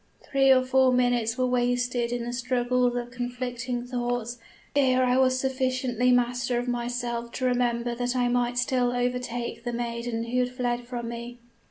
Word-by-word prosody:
Three 270 -1 +4
or 260 -1 +6
four 260 0 +4
minutes 245 -2 +1
were 255 - +2
wasted 245 -1 0
in 245 -1 -2
the 240 - -4
struggles 245 0 +1
of 245 0 -4
conflicting 245 0 -4
thoughts, 245 -1 -3 0.4
ere 255 -2 +4
I 250 0 +3
was 255 -1 +3
sufficiently 255 -2 +1
master 245 0 +1
of 245 +1 -2
myself 240 -1 -2
to 255 - -2
remember 240 -1 +1
that 245 +1 -2
I 245 -1 +2
might 245 0 0
still 245 0 +1
overtake 245 -1 -2
the 240 - -2
maiden 235 -1 -3
who 240 +2 -1
had 250 0 +1
fled 245 -1 -2
from 240 -2 -4
me. 235 +1 -7
245 Hz, 170 wpm, -26 LUFS, 240-250 Hz, 0.4 s, or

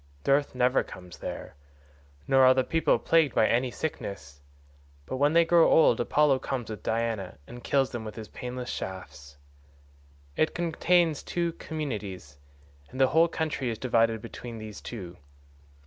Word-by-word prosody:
Dearth 140 -1 +2
never 125 +1 +3
comes 90 -2 -11
there, - - -6 0.7
nor 135 0 +5
are 130 0 +7
the 130 - +2
people 165 +5 +2
plagued 160 -5 +2
by - - +4
any 125 +3 +1
sickness, 70 - -6 0.6
but 130 - -4
when 145 +3 +3
they 170 0 +5
grow 170 0 +5
old 160 - +5
Apollo 145 -3 +3
comes 125 -4 -4
with 110 - -7
Diana 110 -6 -2
and 120 +1 -11
kills 135 -2 +1
them 120 -2 -5
with 110 -1 -8
his 110 -2 -8
painless 125 0 -6
shafts. 75 -7 -7 1.0
It 155 - +1
contains 170 -1 +2
two 170 -1 -2
communities, 100 - -6 0.5
and 130 - -9
the 130 -1 +5
whole 160 +5 +4
country 155 -6 -2
is 115 - -3
divided 115 -3 +1
between 115 0 -8
these 110 -1 -9
two. 90 -7 -8
125 Hz, 155 wpm, -27 LUFS, 110-150 Hz, 1.0 s, are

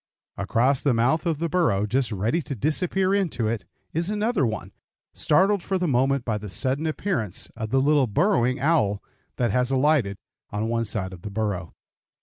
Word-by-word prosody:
Across 125 +7 +1
the 135 -5 +2
mouth 135 +9 +2
of 165 -3 0
the 170 +3 -1
burrow, 145 - +1
just 125 +3 0
ready 110 - 0
to 140 - -5
disappear 180 - +1
into 170 - 0
it, 110 -4 -2 0.3
is 170 +4 0
another 210 - +1
one, 110 - -5 0.4
startled 190 +5 +3
for 190 +2 -1
the 180 -1 0
moment 135 -1 +1
by 110 -3 -1
the 105 0 -8
sudden 135 - -1
appearance 155 - -2
of 110 -2 -5
a 135 - +3
little 140 0 +3
burrowing 130 - +2
owl 135 -10 +1 0.3
that 120 -4 0
has 125 +3 +1
alighted 135 -7 +2 0.3
on 105 +2 -2
one 115 0 0
side 95 -3 -3
of 90 - -11
the 105 - -6
burrow. 100 -4 -3
130 Hz, 180 wpm, -25 LUFS, 110-160 Hz, 0.4 s, startled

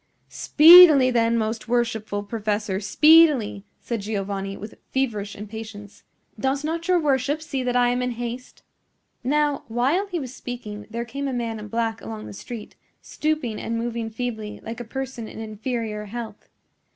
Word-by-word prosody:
"Speedily, 310 -5 +8
then, 230 -1 +2
most 220 +1 -2
worshipful 225 -4 -1
professor, 205 -2 -2
speedily," 295 -4 +4
said 235 -3 -4
Giovanni, 195 -1 -4
with 210 +1 -9 0.2
feverish 215 -7 -2
impatience. 210 0 -9 0.4
"Does 270 +2 0
not 330 +2 -3
your 365 -1 +4
worship 285 -1 +1
see 305 -4 -4
that 250 -1 -1
I 245 0 +4
am 245 +1 0
in 250 -1 -1
haste?" 240 +2 -7 0.6
Now, 290 +2 +1
while 265 - 0
he 360 -3 -3
was 260 -4 -7
speaking 220 -6 -7
there 235 +2 -4
came 275 +4 -4
a 270 - -3
man 230 -2 -3
in 210 - -8
black 225 +1 -2
along 110 -1 -7
the 105 - -9
street, 215 - -9 0.3
stooping 300 -8 -2
and 230 0 -3
moving 230 -1 -3
feebly 220 -2 -5
like 230 +2 -6
a - - -4
person 260 -1 -5
in - - -11
inferior 220 0 -4
health. 220 0 -8
235 Hz, 160 wpm, -23 LUFS, 215-265 Hz, 0.6 s, Speedily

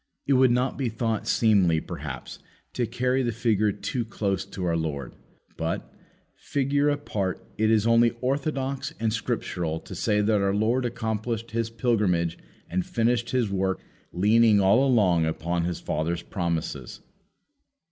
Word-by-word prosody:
It 140 - +2
would 130 -1 +5
not 125 +3 0
be 130 -3 0
thought 115 -1 -2
seemly, 95 -8 +3
perhaps, 70 -5 -7 0.3
to 120 -2 -1
carry 125 +2 0
the 120 -2 0
figure 110 -2 +1
too 120 +4 -3
close 100 -4 -2
to 95 - -5
our 85 -1 +1
Lord. 75 -5 -3 0.4
But, - - -3 0.4
figure 140 +1 0
apart, 110 -10 -2
it 110 0 +3
is 110 -1 +3
only 115 0 +5
orthodox 135 +2 -2
and 110 -2 0
scriptural 85 -7 -2
to - - -10
say 105 0 +1
that 105 -1 +2
our 100 0 +1
Lord 115 +5 +1
accomplished 115 -1 -3
His 115 0 -1
pilgrimage 105 -8 0 0.3
and 90 +1 -1
finished 120 +3 0
His 120 -6 0
work 95 -1 0 0.3
leaning 105 +3 +4
all 100 +7 +5
along 90 -10 +3
upon 85 +2 -1
His 90 -1 -2
Father's 85 +2 -2
promises. 85 -4 -3
110 Hz, 145 wpm, -26 LUFS, 90-120 Hz, 0.4 s, would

